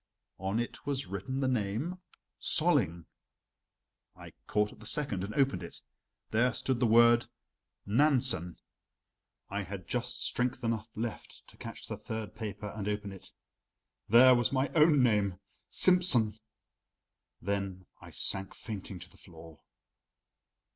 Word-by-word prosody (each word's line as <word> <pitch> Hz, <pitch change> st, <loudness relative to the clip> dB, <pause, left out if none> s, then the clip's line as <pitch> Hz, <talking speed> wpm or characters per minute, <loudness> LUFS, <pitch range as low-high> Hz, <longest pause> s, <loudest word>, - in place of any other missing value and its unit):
On 95 Hz, +4 st, -1 dB
it 120 Hz, -, -5 dB
was 140 Hz, -1 st, -1 dB
written 100 Hz, +9 st, -4 dB
the 135 Hz, -, +1 dB
name: 130 Hz, -, -2 dB, 0.4 s
"Solling." 120 Hz, -, +2 dB, 1.1 s
I -, -, -12 dB
caught 105 Hz, 0 st, 0 dB
at -, -, -18 dB
the 110 Hz, -, -10 dB
second 105 Hz, -11 st, -1 dB
and 100 Hz, -, -4 dB
opened 135 Hz, -1 st, +2 dB
it. -, -, -8 dB, 0.5 s
There 120 Hz, +2 st, +2 dB
stood 130 Hz, -3 st, 0 dB
the 120 Hz, -, +3 dB
word: 120 Hz, +1 st, +5 dB, 0.6 s
"Nansen." 120 Hz, -, +2 dB, 0.9 s
I 100 Hz, +1 st, -2 dB
had 95 Hz, -2 st, -7 dB
just 125 Hz, 0 st, -2 dB
strength 125 Hz, 0 st, 0 dB
enough 115 Hz, -1 st, -2 dB
left 115 Hz, +1 st, -6 dB
to -, -, -15 dB
catch -, -, -8 dB
the -, -, -5 dB
third 110 Hz, -1 st, -6 dB
paper 105 Hz, -2 st, -6 dB
and 105 Hz, -2 st, -4 dB
open 105 Hz, -1 st, -3 dB
it 95 Hz, -, -11 dB, 0.8 s
there 125 Hz, +4 st, +8 dB
was 120 Hz, -2 st, +2 dB
my 135 Hz, +1 st, +1 dB
own 150 Hz, -4 st, +5 dB
name: 105 Hz, -6 st, +2 dB, 0.3 s
"Simsen." 130 Hz, -, +4 dB, 1.0 s
Then 100 Hz, -1 st, -3 dB, 0.2 s
I -, -, -11 dB
sank 95 Hz, 0 st, 0 dB
fainting 100 Hz, -3 st, -7 dB
to 90 Hz, -, -9 dB
the -, -, -19 dB
floor. 80 Hz, -4 st, -14 dB
110 Hz, 135 wpm, -31 LUFS, 100-130 Hz, 1.1 s, there